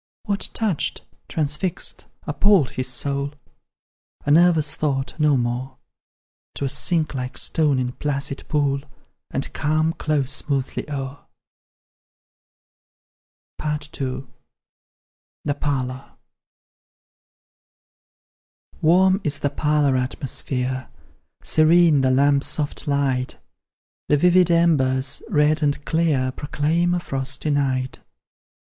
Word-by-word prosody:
What 200 -3 -1
touched, 210 -9 -1 0.2
transfixed, 155 +3 0 0.2
appalled, 165 -1 +3
his 130 +1 -3
soul? 140 +3 -2 0.9
A 145 - +1
nervous 160 -2 +4
thought, 135 -3 -2
no 150 -2 +4
more; 125 +2 -3 0.8
'Twill 140 - -2
sink 160 +1 0
like 125 -1 -4
stone 150 -4 +1
in 125 -1 -1
placid 140 0 -3
pool, 140 -2 +1 0.5
And 135 - -3
calm 155 +2 +1
close 145 -5 -1
smoothly 140 0 -2
o'er. 140 -1 -6 2.4
II. 145 -3 -3 1.2
THE 145 - +1
PARLOUR. 135 -3 -3 2.6
Warm 185 +4 +4
is 145 -1 +1
the 145 - 0
parlour 150 -2 +2
atmosphere, 130 0 -2 0.5
Serene 160 -2 +5
the 130 - +2
lamp's 140 +2 +3
soft 150 +1 -2
light; 135 -3 0 0.7
The 150 - +3
vivid 180 +2 +4
embers, 140 -6 +2
red 155 -3 +3
and 145 -1 0
clear, 155 -6 +1
Proclaim 160 +6 0
a - - 0
frosty 135 -1 -2
night. 130 -2 0
145 Hz, 95 wpm, -22 LUFS, 135-155 Hz, 2.6 s, Serene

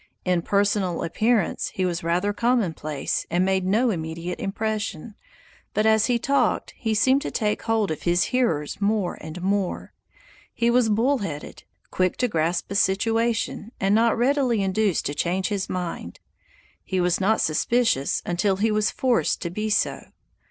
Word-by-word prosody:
In 180 -2 +2
personal 200 -2 0
appearance 215 +3 +1
he 185 - 0
was 175 0 -2
rather 180 +5 0
commonplace 190 - -1
and 175 +2 +1
made 190 -1 +1
no 225 +5 +2
immediate 165 0 -4
impression, 215 -2 -3 0.6
but 215 - +2
as 220 0 +4
he 245 -1 +2
talked 260 -1 0
he 220 -2 -2
seemed 260 +6 +3
to - - -3
take 210 -2 -1
hold 225 -5 0
of 155 - -4
his 175 +1 +2
hearers 185 - 0
more 200 -2 0
and 160 +3 -8
more. 195 -1 -1 0.6
He 235 0 +2
was 245 -2 +3
bull 245 +6 +2
headed; 155 -8 -7 0.3
quick 185 -1 0
to 250 - +1
grasp 170 -2 -1
a - - -3
situation, 225 +3 0
and 195 +1 +2
not 230 +2 +3
readily 250 -3 +2
induced 195 -2 0
to 145 - -1
change 180 +5 -1
his 200 -2 -2
mind. 170 - -5 0.6
He 190 - -2
was 180 +1 +1
not 220 +4 +2
suspicious 160 - +1
until 175 +3 +1
he 215 +3 +1
was 210 0 +2
forced 250 -3 +1
to 170 - -3
be 215 +4 -3
so. 210 - 0
200 Hz, 160 wpm, -24 LUFS, 175-225 Hz, 0.6 s, as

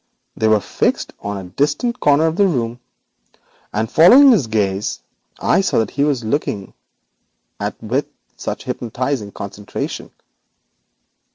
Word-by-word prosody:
They 110 - +1
were 110 -1 +4
fixed - - -1
on 100 0 -4
a 95 -2 -8
distant 235 - 0
corner 145 +2 +4
of 160 0 0
the 200 +1 +4
room, 120 -7 -2 0.9
and 110 +1 -1
following 250 - +7
his 165 - +3
gaze 100 -2 -1 0.4
I - - +3
saw 190 - 0
what 110 -2 +1
he 140 - 0
was 145 -4 +1
staring 110 -4 -2 0.9
at - - -4
with - - -1 0.3
such - - -5
hypnotising 120 -2 -3
concentration. 100 +1 -6
120 Hz, 130 wpm, -19 LUFS, 105-155 Hz, 0.9 s, following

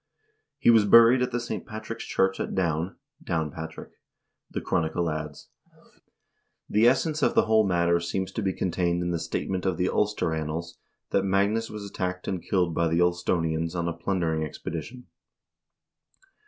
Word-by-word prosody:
He - - +5
was 110 -3 +5
buried 115 +4 +7
at 125 - +1
the 120 - -1
St. 120 - -4
Patrick's 110 -1 -7
church 95 0 +1
at - - -3
Down 85 0 -1 0.3
(Downpatrick), 80 0 -4 0.6
the - - -3
chronicle 85 0 -1
adds. 75 -1 -6 1.2
The 110 +3 +4
essence 150 +4 +2
of - - +2
the - - +5
whole 110 -1 +4
matter 85 -1 +2
seems 95 +3 -3
to 110 - -3
be 95 -2 0
con 90 0 -2
tained 85 0 0
in 90 - -1
the 85 - -1
statement 90 +3 -3
of 95 -3 0
the 90 +1 +1
"Ulster 105 -6 0
Annals" 80 +2 -4 0.3
that 100 - +3
Magnus 100 +4 +1
was 105 -1 -7
attacked 90 -2 -4
and 95 -3 -2
killed 90 -2 0
by 85 +1 +1
the 80 +1 +1
Ulstonians 85 -1 0
on 85 -1 -1
a 85 - -1
plundering 85 -2 -1
expedition. 85 - -6
90 Hz, 165 wpm, -26 LUFS, 85-100 Hz, 1.2 s, buried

